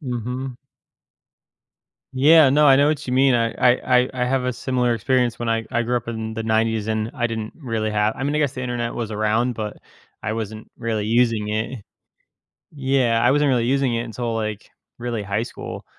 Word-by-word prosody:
Mhm. 125 -1 -4 1.6
Yeah. 145 +2 +6
No, 150 +2 +4
I 135 - +8
know 140 +2 +4
what 150 -2 -2
you 125 - -3
mean. 130 0 +4
I 115 -1 +1
I 125 0 +3
I 125 - -2
I - - +4
have 130 +1 0
a 125 - 0
similar 125 0 0
experience 120 +1 0
when 120 -1 -3
I 115 0 0
I 120 - +1
grew 120 +1 0
up 120 -1 -4
in 110 -1 -4
the 110 - -3
‘90s, 110 -1 0
and 110 0 -1
I 120 -4 0
didn't 110 -1 -5
really 115 -7 -2
have 105 +1 +1
I 135 - -4
mean, 145 +1 -1
I - - +1
guess, 145 -4 +1
the 130 - -6
Internet 120 -1 -3
was 115 -2 -4
around, 110 +4 0
but 105 -2 -5 0.5
I 110 - -2
wasn't 110 -1 -6
really 110 -3 -2
using 115 -2 +2
it. 110 +2 -3 0.9
Yeah, 130 -4 +1
I 125 - +5
wasn't 145 0 +3
really 120 -3 +2
using 135 -1 +1
it 115 - -1
until, 120 0 -4
like, 110 -2 -4 0.3
really 120 -3 -3
high 100 +3 -1
school, - - -8
120 Hz, 205 wpm, -22 LUFS, 110-130 Hz, 1.6 s, I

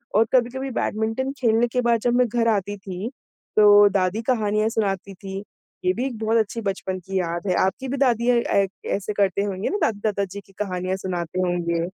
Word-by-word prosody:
और 220 +2 +5
कभी-कभी 260 +2 +1
बैडमिंटन 225 +4 -1
खेलने 235 -1 +3
के 250 +2 0
बाद 235 -1 +2
जब 240 +1 +1
मैं 250 0 +4
घर 230 0 0
आती 205 -2 0
थी, 195 +2 -5 0.5
तो 205 -1 +8
दादी 190 +3 0
कहानियाँ 215 -3 +1
सुनाती 200 -3 -2
थीं, 195 +1 -7 0.4
ये 185 - +4
भी 245 +6 -2
एक 250 -5 -4
बहुत 225 +1 +1
अच्छी 225 +1 0
बचपन 190 -2 -3
की 190 +1 -3
याद 170 +2 -3
है। 180 - +2
आपकी 195 +8 -1
भी 275 - -2
दादियाँ 245 -2 +3
अ, 200 -4 +2 0.2
ऐसे 205 +1 -2
करते 200 -1 +1
होंगे 195 -1 -2
ना 405 - -1
दादी-दादा 205 -2 0
जी 195 +1 -8
की 195 - -22
कहानियाँ 185 -2 -2
सुनाते 180 -2 -3
होंगे, 175 -2 0
205 Hz, 195 wpm, -23 LUFS, 190-230 Hz, 0.5 s, तो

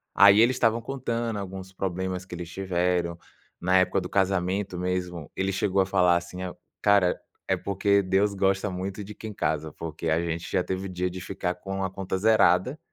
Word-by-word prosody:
Aí 100 +1 +8
eles 120 +3 +5
estavam 115 -1 +2
contando 115 -4 -2
alguns 95 -1 -7
problemas 95 -1 -3
que 90 - -11
eles 85 -1 -6
tiveram, 90 -1 0 0.4
na 90 +1 +3
época 95 +1 +3
do - - -6
casamento 95 -1 0
mesmo, 90 -3 -3
ele 95 +1 0
chegou 95 0 +1
a - - +2
falar 90 -2 +4
assim, 85 +1 -4
ao 90 - -6 0.2
"Cara, 100 -3 +4 0.3
é - - +1
porque 100 +1 +2
Deus 95 +2 +2
gosta 95 +1 +1
muito 95 +3 -4
de 105 +2 -9
quem 110 +1 -8
casa, 80 -4 -1
porque 80 0 -6
a 80 +1 +3
gente 85 0 -3
já 90 - +1
teve 95 +1 -3
dia 90 0 -2
de 90 +1 -7
ficar 90 -1 -3
com 95 +1 -4
a 95 - -2
conta 95 -1 -3
zerada, 110 - +3
95 Hz, 190 wpm, -26 LUFS, 90-100 Hz, 0.4 s, Aí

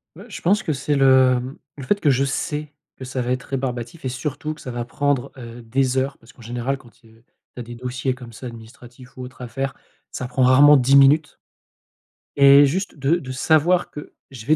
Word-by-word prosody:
Ouais, 195 +6 -12
je - - -8
pense 205 +5 +2
que 155 - -2
c'est 140 +2 -2
le, 130 -1 +5
hem, 130 +3 -7 0.2
le 140 - -9
fait 200 +9 0
que 145 - +3
je 135 +1 +1
sais 150 +2 -3 0.3
que 130 - -9
ça 130 0 -4
va 125 - -3
être 125 0 -2
rébarbatif 130 +2 -5
et - - -1
surtout 150 +4 -4
que 150 - -15
ça 130 - -8
va 120 -1 -4
prendre, 145 0 -1
heu, 120 -1 -10
des 130 +3 0
heures 135 +1 -2
parce 115 +5 -19
qu'en 120 - -17
général, 120 +4 -3
quand 120 -3 -18
tu, 115 - -25
heu, 110 +1 -23 0.3
tu - - -9
as - - -5
des 120 +1 -10
dossiers 125 +2 -3
comme 125 -2 -12
ça 120 +3 -11
administratifs 120 +2 -13
ou 130 - -7
autre 125 0 -11
à 125 - -6
faire, 135 +4 -4 0.4
ça 125 - -5
prend 130 0 0
rarement 145 +3 +7
10 135 +2 +3
minutes 145 +2 +4 1.0
et 140 +1 +7
juste 185 +8 -2
de 140 +5 +1
de 130 -6 -8
savoir 160 +6 +2
que 150 - -10 0.2
je 120 -4 -10
vais 155 +2 +3
130 Hz, 230 wpm, -21 LUFS, 125-145 Hz, 1.0 s, rarement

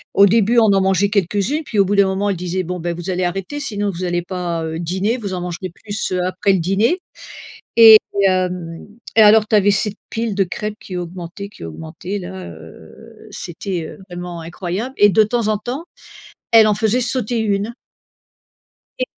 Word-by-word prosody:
au 200 - +7
début, 225 +3 +3
on 225 - +5
en 195 - +3
mangeait 190 +1 +2
quelques-unes, 205 - 0
puis 220 - -5
au 200 - +5
bout 200 +2 0
d'un 200 -1 +4
moment, 195 +2 -1
elle - - -2
disait: 180 +1 -2
«Bon 180 +1 -5
beh, 170 +1 -2
vous 175 +2 -6
allez 185 0 -1
arrêter, 195 +10 -3
sinon 205 -7 -2
vous 180 0 -6
allez 175 -1 -1
pas, 175 -2 -3
heu, 160 0 -4
dîner, 190 +7 -1
vous 205 -6 -5
en 180 - -4
mangerez 180 +1 -5
plus, 205 +4 -5
heu, 180 - 0
après 185 +2 +1
le 190 - +1
dîner» 200 - +1 0.8
et 225 -1 +10 0.3
hem 180 -3 -1 0.4
et 220 - +8
alors 215 0 +6
tu 215 - +3
avais 205 0 +4
cette 205 +1 +1
pile 225 -2 -2
de 195 0 +2
crêpes 210 +3 -5
qui 185 - -7
augmentait, 175 +2 -7
qui 200 - -12
augmentait 160 - -6
là, 190 0 -8
heu, 80 -1 -14
c'était, 175 0 -5
heu, - - -11
vraiment 175 -1 -6
incroyable 180 +8 -4
et 205 - +7
de 205 +4 +5
temps 230 0 -1
en 215 - +2
temps, 250 +9 -5 0.7
elle 225 -1 +7
en 210 - +2
faisait 220 +3 +1
sauter 245 -1 -1
une. 210 +1 -1 1.2
Et 255 - +1
195 Hz, 195 wpm, -19 LUFS, 175-215 Hz, 1.2 s, et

